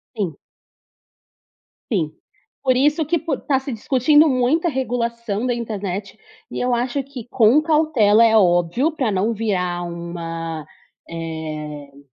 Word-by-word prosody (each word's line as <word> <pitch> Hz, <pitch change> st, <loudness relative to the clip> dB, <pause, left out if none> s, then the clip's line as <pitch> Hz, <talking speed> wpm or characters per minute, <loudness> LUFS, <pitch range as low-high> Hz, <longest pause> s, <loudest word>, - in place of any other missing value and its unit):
Sim. 190 Hz, -9 st, -2 dB, 1.6 s
Sim. 165 Hz, -8 st, 0 dB, 0.5 s
Por 260 Hz, -2 st, +3 dB
isso 295 Hz, +5 st, +2 dB
que 335 Hz, +3 st, +1 dB
por 285 Hz, -2 st, -3 dB
tá 270 Hz, -2 st, +1 dB
se 265 Hz, 0 st, -6 dB
discutindo 270 Hz, +7 st, +3 dB
muita 270 Hz, +5 st, +2 dB
regulação 235 Hz, -5 st, -2 dB
da 250 Hz, -, +1 dB
internet 205 Hz, -4 st, -4 dB, 0.3 s
e -, -, -4 dB
eu 250 Hz, 0 st, +1 dB
acho 250 Hz, +3 st, -1 dB
que 265 Hz, -4 st, -9 dB
com 245 Hz, +5 st, +4 dB
cautela, 300 Hz, -9 st, +4 dB
é 225 Hz, -1 st, +4 dB
óbvio, 180 Hz, -, +3 dB
pra 260 Hz, -8 st, -1 dB
não 200 Hz, +5 st, 0 dB
virar 180 Hz, -5 st, -1 dB
uma, 165 Hz, -2 st, -5 dB, 0.4 s
eh 155 Hz, -3 st, -7 dB
225 Hz, 130 wpm, -21 LUFS, 175-265 Hz, 1.6 s, com